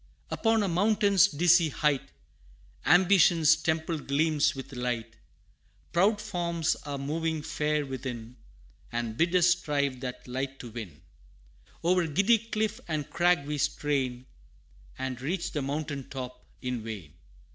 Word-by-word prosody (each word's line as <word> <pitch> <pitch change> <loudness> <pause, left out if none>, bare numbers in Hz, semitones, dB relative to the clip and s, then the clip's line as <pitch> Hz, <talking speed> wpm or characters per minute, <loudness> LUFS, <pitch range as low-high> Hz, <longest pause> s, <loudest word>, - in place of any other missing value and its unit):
III. - - -33
Upon 225 -1 +2
a - - 0
mountain's 200 +2 +4
dizzy 170 0 +4
height, 150 -2 0 0.8
Ambition's 170 -2 +6
temple 160 0 -1
gleams 150 +2 +1
with 135 +1 -8
light: 120 -2 -3 0.8
Proud 200 +5 +3
forms 170 -6 -1
are 140 -1 -3
moving 155 +2 -2
fair 150 -1 -1
within, 125 -3 -6 0.6
And 120 -2 -3
bid 170 +6 +1
us 175 -1 +5
strive 145 -6 0
that 125 -1 -6
light 135 +2 -3
to 120 -3 -9
win. 105 - -8 0.8
O'er 175 0 +3
giddy 200 +9 +3
cliff 220 -1 -2
and 155 -3 -3
crag 175 -4 +3
we 150 0 -3
strain, 130 -3 -1 0.7
And 130 -2 -4
reach 175 +5 -2
the 150 - -2
mountain 140 0 -4
top 125 -1 -7 0.2
in 125 -2 -2
vain! 100 -10 -7
150 Hz, 135 wpm, -28 LUFS, 130-175 Hz, 0.8 s, Ambition's